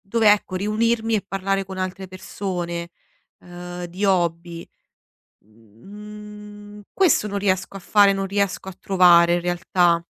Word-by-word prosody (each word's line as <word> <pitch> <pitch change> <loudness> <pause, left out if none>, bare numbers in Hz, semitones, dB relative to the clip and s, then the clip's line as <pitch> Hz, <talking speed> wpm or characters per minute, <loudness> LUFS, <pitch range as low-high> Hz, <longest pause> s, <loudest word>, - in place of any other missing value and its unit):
dove, 215 +1 +3
ecco 205 -2 +1
riunirmi 220 +3 0
e 200 - -4
parlare 195 0 -2
con 190 0 -9
altre 185 +1 -4
persone, 175 -2 -5 0.5
ehm, 175 0 -8
di 185 +4 -5
hobby. 170 -2 -1 0.8
Mhmm, 210 - -13
questo 350 - +2
non 200 0 -4
riesco 195 0 -1
a - - -9
fare, 200 +1 +4
non 195 0 -2
riesco 200 -1 -2
a 190 - -7
trovare 175 -2 +5
in - - 0
realtà. 175 -1 +1
190 Hz, 135 wpm, -22 LUFS, 175-205 Hz, 0.8 s, trovare